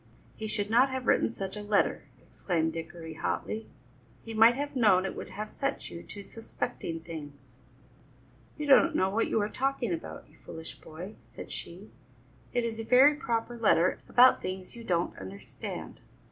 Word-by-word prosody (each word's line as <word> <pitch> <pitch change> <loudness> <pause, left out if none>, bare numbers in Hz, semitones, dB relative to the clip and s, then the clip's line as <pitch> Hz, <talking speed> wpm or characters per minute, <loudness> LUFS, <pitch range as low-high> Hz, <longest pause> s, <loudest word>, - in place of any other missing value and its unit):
"He 220 - -5
should 205 0 -2
not 250 +4 +5
have 260 -1 -3
written - - +3
such 195 -3 -5
a 210 - -5
letter," 205 -1 +1
exclaimed 160 -3 -2
Dickory 165 0 -7
hotly; 215 +7 -3 0.6
"he 225 - -7
might 225 +2 +7
have 285 +1 -4
known 205 -7 +5
it 190 - -3
would - - -7
have 215 +1 -6
set 275 0 -3
you 170 - -7
to 205 - -10
suspecting 170 -6 -5
things." 145 -6 -9 1.0
"You 300 - -3
don't 305 +3 +6
know 190 +1 +2
what 225 +3 +1
you - - +1
are 205 - +1
talking 255 -3 -1
about, 165 - -6
you 150 - -22
foolish 160 0 -9
boy," 180 +7 -9
said - - -9
she; 185 +5 -8 0.6
"it 245 - +1
is 225 -1 -3
a - - -2
very 260 +6 +7
proper 240 -6 -2
letter 185 -5 +3
about 250 +1 +7
things 185 +2 -5
you 235 - -9
don't 175 -5 0
understand." 95 +1 -8
210 Hz, 175 wpm, -29 LUFS, 170-240 Hz, 1.0 s, might